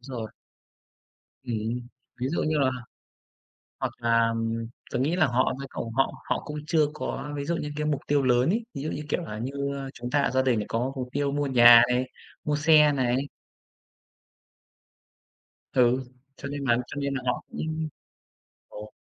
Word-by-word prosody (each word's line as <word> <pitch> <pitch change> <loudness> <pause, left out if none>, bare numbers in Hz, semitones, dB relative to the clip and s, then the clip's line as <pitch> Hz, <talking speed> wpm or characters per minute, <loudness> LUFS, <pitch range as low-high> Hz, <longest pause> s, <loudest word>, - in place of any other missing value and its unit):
rồi. 120 -4 -6 1.1
Ừm, 115 -1 -2 0.4
ví 130 - 0
dụ 165 - -1
như 155 0 +1
là 135 -2 +3 1.1
hoặc - - -1
là, 115 -1 +3
ừm, 115 0 -2 0.2
tớ - - -1
nghĩ 150 +7 +1
là 155 -5 +4
họ 130 +1 +2
cũng - - -4
phải 140 - -6
cầu 115 - -5
họ 135 0 +2 0.2
họ - - 0
cũng 150 - -5
chưa 160 -2 +3
có 150 -1 -4
ví 140 -1 -3
dụ 170 +3 0
như 150 -2 -4
cái 150 0 -2
mục 150 -2 0
tiêu 145 -1 +2
lớn 125 +1 +3
ấy, 225 +5 0
ví 135 - -5
dụ, 155 - -2
như - - -4
kiểu - - 0
là, 105 -10 -6
như, 140 +1 -3
a, 135 -1 -5
chúng 120 0 -6
ta 145 - +2
ở - - +1
gia 130 - +3
đình 130 -4 +2
này 105 - -2
có 120 +4 -1
mục 130 -2 -4
tiêu 140 0 0
mua 145 0 0
nhà 120 -2 +9
này, 125 +1 +1 0.4
mua 150 - 0
xe 150 0 +6
này. 130 -3 +1 2.6
Ừ, 125 0 +3 0.3
cho 140 - -6
nên 145 0 -4
bạn 120 -2 +3
cho - - -9
nên 140 -1 -1
là 135 - -2
họ 125 - -1
cũng 160 0 -3 0.8
ồ. 105 +1 -10
135 Hz, 190 wpm, -26 LUFS, 120-145 Hz, 2.6 s, nhà